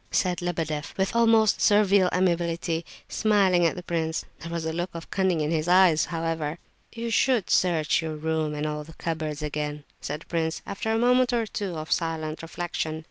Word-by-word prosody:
said 180 -2 0
Lebedeff 160 -4 -3
with 190 +3 0
almost 225 -2 +4
servile 200 -3 +4
amiability, 170 -2 0 0.2
smiling 195 -5 +3
at - - -2
the 180 - -7
prince. 160 -2 -2
There 165 - -8
was 170 -1 -3
a 160 - -2
look 175 +2 -2
of 165 - -8
cunning 185 -4 +1
in 150 +1 -1
his 160 0 0
eyes, 180 -3 +5
however. 165 -2 -3 0.3
"You 230 0 -4
should 245 -3 +2
search 165 -4 +2
your 160 -1 -4
room 155 0 -1
and 150 +1 -2
all 150 0 -3
the 160 +2 -13
cupboards 155 -2 -3
again," 150 0 -3 0.2
said 150 +2 -4
the - - -14
prince, 160 -1 -2
after 200 +3 -3
a 225 - +2
moment 250 +1 +3
or 230 -2 +1
two 200 -5 -4
of 155 0 -6
silent 160 -1 -1
reflection. 165 -1 -4
165 Hz, 190 wpm, -26 LUFS, 155-190 Hz, 0.3 s, eyes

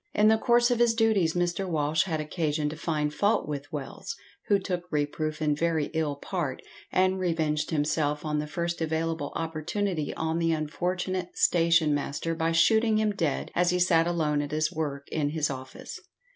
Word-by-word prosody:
In 210 +1 +5
the 220 0 +4
course 240 0 +4
of 240 - +1
his 235 -1 +4
duties 215 -8 +2
Mr. 175 +2 0
Walsh 155 0 +1
had 160 -4 -2
occasion 155 -1 -1
to 155 - -6
find 150 -2 -1
fault 205 +2 +1
with 145 -1 -5
Wells, 150 - -6 0.3
who 205 - +4
took 180 -2 -3
reproof 155 +1 -2
in 150 -1 +2
very 160 -1 0
ill 155 -3 0
part, 145 -2 -4 0.3
and 185 0 +2
revenged 160 -4 0
himself 150 0 0
on 150 -1 0
the 150 - -3
first 170 +1 -3
available 160 -1 -1
opportunity 165 +1 -2
on 160 +1 -1
the 165 -1 +2
unfortunate 180 +4 -2
station 165 -3 +4
master 145 +3 -2
by 165 0 0
shooting 220 +7 +4
him 215 -1 +2
dead 165 -8 -2
as 175 0 +2
he 180 - +2
sat 170 -2 +4
alone 155 -4 +1
at 145 - -4
his 155 +2 0
work 145 -3 -3
in 150 -2 0
his 150 -1 -1
office. 130 -1 -8
160 Hz, 180 wpm, -27 LUFS, 150-180 Hz, 0.3 s, In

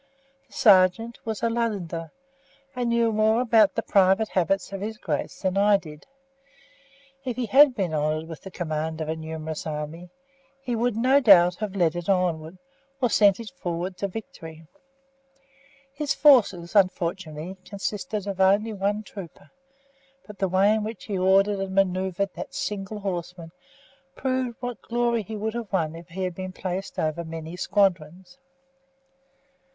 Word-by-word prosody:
The - - -22
sergeant 205 0 +4
was 220 -1 -4
a 230 - +3
Londoner, 190 -8 -3 0.6
and 245 -1 -1
knew 235 -1 +2
more 220 +1 +3
about 225 -5 +4
the - - -1
private 195 +2 +3
habits 190 +2 0
of 195 - -5
his 220 +1 -4
Grace 155 -2 -4
than 185 0 0
I 205 0 +5
did. 155 -5 -12 1.2
If 250 -3 -3
he 250 0 -2
had 270 +3 +6
been 185 -7 -2
honoured 155 +1 -1
with 165 -1 -9
the 190 - -9
command 160 -3 -3
of 155 -1 -4
a 160 - -1
numerous 160 0 -6
army, 155 +3 -6 0.5
he 250 -3 -3
would, 235 -1 0
no 260 +4 +4
doubt, 180 -8 +6
have 210 -2 -4
led 175 -4 +2
it 175 +2 -5
onward, 175 -3 0 0.4
or 245 -4 +1
sent 200 -1 +4
it 230 -2 -8
forward 180 -6 -4
to 200 - -2
victory. 165 -6 -9 1.3
His 285 0 -2
forces, 215 - +4
unfortunately, 180 -2 0
consisted 205 +2 -4
of 195 -2 -3
only 205 +4 +3
one 205 +2 -1
trooper, 185 -5 -11 0.7
but 210 -3 -12
the 195 - +1
way 195 +3 +4
in 220 -1 0
which 215 -2 -6
he 200 -3 -3
ordered 195 +2 +3
and 190 0 -4
manoeuvred 190 0 0
that - - -8
single 210 +1 -4
horseman 175 -3 -5 0.6
proved 255 -2 -2
what 245 -3 -5
glory 235 -1 0
he 215 +2 -7
would 215 +1 -3
have 235 -3 -5
won 165 -5 0
if 170 0 -11
he 185 +2 -5
had 180 -1 -2
been 185 +1 -6
placed 185 +1 -5
over 155 +2 -1
many 165 0 -7
squadrons. 185 - -1
195 Hz, 160 wpm, -25 LUFS, 170-220 Hz, 1.3 s, had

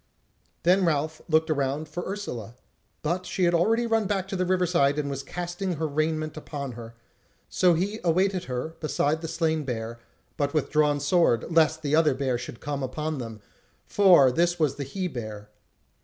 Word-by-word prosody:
Then 185 +3 +4
Ralph 155 -1 0
looked 160 0 +3
around 145 +1 -1
for 175 +3 -5
Ursula; 125 - -5 0.5
but 175 +4 -1
she 185 +1 -1
had 175 0 +3
already 225 +8 +2
run 225 -2 +1
back 195 -2 -1
to 195 - -3
the 185 -1 0
river 185 0 +2
side 145 -5 +2
and 145 -2 -1
was 135 -1 -3
casting 175 +5 -4
her 160 0 -2
raiment 155 +1 -1 0.2
on 140 -3 -4
her; 115 -1 -10 0.5
so 180 -2 +3
he 200 +6 -2
awaited 185 +2 +1
her 125 +4 -3
beside 155 0 0
the 165 - -4
slain 160 -1 0
bear, 115 -3 -4 0.4
but 145 +1 -1
with 150 - 0
drawn 150 -1 +3
sword, 145 -3 +2
lest 160 -1 +3
the 145 +1 +2
other 155 -4 +4
bear 130 -3 -1
should 120 -1 -8
come 145 -1 -3
upon 150 +3 -3
them; 115 -3 -7 0.4
for 180 -10 +6
this 175 +5 +1
was 155 -4 +2
the 140 - -3
he 185 +7 -3
bear. 110 -7 -7
155 Hz, 185 wpm, -26 LUFS, 140-175 Hz, 0.5 s, for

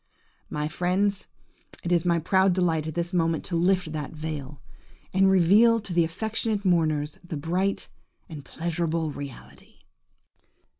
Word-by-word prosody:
My 150 0 -2
friends, 190 +4 0 0.6
it 175 - -3
is 175 -1 +2
my 170 -1 +3
proud 190 +3 +3
delight 165 -4 0
at 160 - -5
this 170 +1 -3
moment 165 -2 +1
to 175 - -3
lift 180 -1 +1
that 150 -1 -5
veil, 150 -3 -6 0.5
and 190 +1 +4
reveal 205 +6 +5
to 205 -4 -7
the 170 -1 +4
affectionate 215 +4 -2
mourners 155 -4 +1
the 170 -3 -6
bright 180 +6 -1 0.4
and 150 -4 -9
pleasurable 165 +1 -2
reality! 140 -2 -11
170 Hz, 140 wpm, -26 LUFS, 155-190 Hz, 0.6 s, reveal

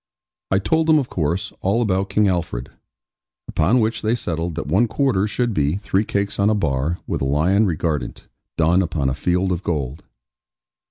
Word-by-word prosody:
I 95 - +3
told 160 +11 +1
them, 160 -1 +6
of 135 -4 -1
course, 85 +2 -2
all 100 +5 +1
about 95 -4 0
King 105 +1 +2
Alfred; 85 -9 -2 0.8
upon 90 +11 +2
which 110 0 0
they 110 +2 +1
settled 85 -6 -3
that 85 - -4
one 95 - +2
quarter 110 -5 +1
should 120 +2 -1
be, 75 -1 +1
three 100 +1 0
cakes 100 0 -2
on 100 +1 +4
a 110 - +2
bar, 75 -3 0
with - - -3
a - - 0
lion 90 +10 +2
regardant, 80 -7 -3 0.3
done 85 +3 +3
upon 80 -7 -1
a - - -1
field 90 +6 0
of 90 -1 -1
gold. 75 -6 -3
95 Hz, 180 wpm, -21 LUFS, 80-105 Hz, 0.8 s, them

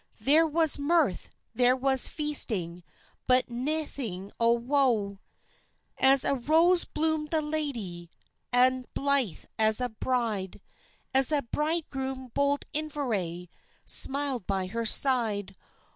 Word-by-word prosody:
There 315 +4 +3
was 320 -1 +1
mirth, 285 - 0 0.2
there 250 0 +2
was 265 0 +2
feasting, 215 - 0 0.5
But 255 -1 +2
naething 245 - -4
o' 230 0 +3
woe. 235 -5 -1 0.8
"As 270 0 +4
a - - +1
rose 325 +7 +2
bloomed 315 -1 -2
the 320 - +1
lady, 255 - -4 0.4
An' 255 +1 +2
blithe 275 - 0
as 220 +1 +4
a 250 -1 -1
bride, 220 -5 -3 0.5
As 265 +2 +4
a 290 -2 +2
bridegroom 270 -2 -4
bold 280 0 -1
Inveraye 225 - -4 0.4
Smiled 275 -6 +2
by 195 -2 -2
her 230 +5 -4
side. 215 -7 +3
260 Hz, 115 wpm, -27 LUFS, 220-290 Hz, 0.8 s, As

